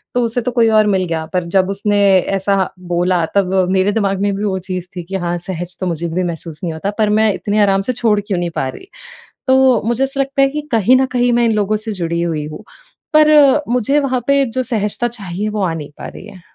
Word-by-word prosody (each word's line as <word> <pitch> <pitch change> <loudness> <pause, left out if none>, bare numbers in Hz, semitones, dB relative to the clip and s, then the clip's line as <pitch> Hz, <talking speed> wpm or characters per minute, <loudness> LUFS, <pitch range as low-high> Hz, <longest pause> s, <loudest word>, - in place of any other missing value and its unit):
तो 245 - +2
उसे 230 +1 -1
तो 250 - -2
कोई 230 -2 +3
और 215 -1 +4
मिल 185 - -1
गया 160 -1 -3
पर 180 -1 0
जब 185 0 +2
उसने 205 +1 0 0.4
ऐसा 195 -1 0 0.2
बोला 175 -1 +1
तब 190 -2 +1 0.2
मेरे 190 +1 +2
दिमाग 200 -2 0
में 205 - +1
भी 205 - -4
वो 190 -2 -1
चीज़ 185 -1 -5
थी 175 - -5
कि 190 +3 -7
हाँ, 175 -2 -2
सहज 175 0 -6
तो 185 - -2
मुझे 170 0 -2
भी 180 +3 -1
महसूस 165 -2 -5
नहीं 165 -3 -2
होता 195 +6 -3
पर 215 -2 +2
मैं 215 0 +3
इतने 210 +2 -1
आराम 195 -1 +2
से 255 +5 -2
छोड़ 225 -3 +1
क्यों 190 - -1
नहीं 175 -1 -2
पा 135 - -1
रही। 380 - -11 0.6
तो 260 -2 +4
मुझे 240 +3 +1
ऐसा 270 +1 -3
लगता 275 +1 0
है 275 - +4
कि 300 +2 -4
कहीं 230 +2 +4
न 265 - +2
कहीं 245 -1 +2
मैं 240 0 +3
इन 230 - +2
लोगों 210 0 0
से 215 +1 -5
जुड़ी 170 -2 -2
हुई 160 -3 -2
हूँ, 155 +7 -9 0.5
पर 305 0 +6 0.4
मुझे 250 +4 +2
वहाँ 260 -3 -1
पे 280 0 +4
जो 255 +1 -2
सहजता 225 -1 -1
चाहिए, 210 -3 -5
वो 210 -1 -3
आ 170 -3 0
नहीं 150 -3 -7
पा - - -6
रही - - -11
है। 185 - -13
205 Hz, 245 wpm, -17 LUFS, 180-240 Hz, 0.6 s, पर